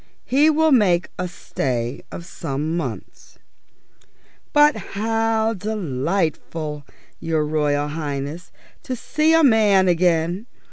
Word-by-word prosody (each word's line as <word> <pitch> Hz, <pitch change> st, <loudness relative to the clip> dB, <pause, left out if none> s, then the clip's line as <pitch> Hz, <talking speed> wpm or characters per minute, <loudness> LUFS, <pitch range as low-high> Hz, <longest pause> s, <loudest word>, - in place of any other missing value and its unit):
He 290 Hz, +4 st, +4 dB
will 315 Hz, 0 st, +3 dB
make 190 Hz, -9 st, +3 dB
a 180 Hz, -, -1 dB
stay 125 Hz, -7 st, -3 dB
of 170 Hz, -, -8 dB
some 155 Hz, -2 st, -4 dB
months." 125 Hz, -, -6 dB, 1.1 s
"But 295 Hz, 0 st, +5 dB, 0.2 s
how 225 Hz, +1 st, +1 dB
delightful, 165 Hz, -, -3 dB, 0.3 s
your 160 Hz, -2 st, 0 dB
Royal 150 Hz, -1 st, 0 dB
Highness, 150 Hz, +2 st, -5 dB, 0.3 s
to 260 Hz, -5 st, -4 dB
see 310 Hz, +6 st, +1 dB
a 325 Hz, -, +4 dB
man 210 Hz, -7 st, +4 dB
again! 175 Hz, +3 st, +1 dB
175 Hz, 105 wpm, -21 LUFS, 150-225 Hz, 1.1 s, But